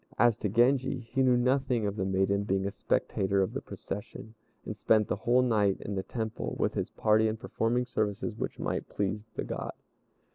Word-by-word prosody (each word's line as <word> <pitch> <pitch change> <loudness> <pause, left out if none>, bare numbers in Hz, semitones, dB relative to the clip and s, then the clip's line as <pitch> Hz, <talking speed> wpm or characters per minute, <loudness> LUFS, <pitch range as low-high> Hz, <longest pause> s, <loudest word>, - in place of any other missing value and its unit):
As 120 -2 +5
to 105 - -2
Genji, 130 +5 +3
he 125 +3 -2
knew 125 -2 +4
nothing 125 -2 +1
of 100 0 -1
the 95 - -1
maiden 95 +1 +1
being 95 -1 0
a 100 - -1
spectator 95 0 0
of 95 - -3
the - - -3
procession, 105 +2 -7 0.3
and 110 - -4
spent 105 0 +3
the - - 0
whole 125 +2 +3
night 105 -5 +2
in 100 - -5
the 95 - -1
Temple 110 +2 -4
with - - 0
his - - -2
party 110 +1 +3
in 110 0 -1
performing 120 +2 0
services 105 -1 -2
which - - -4
might - - -3
please 105 +2 -2
the - - -2
God. - - -4
110 Hz, 195 wpm, -30 LUFS, 100-120 Hz, 0.3 s, As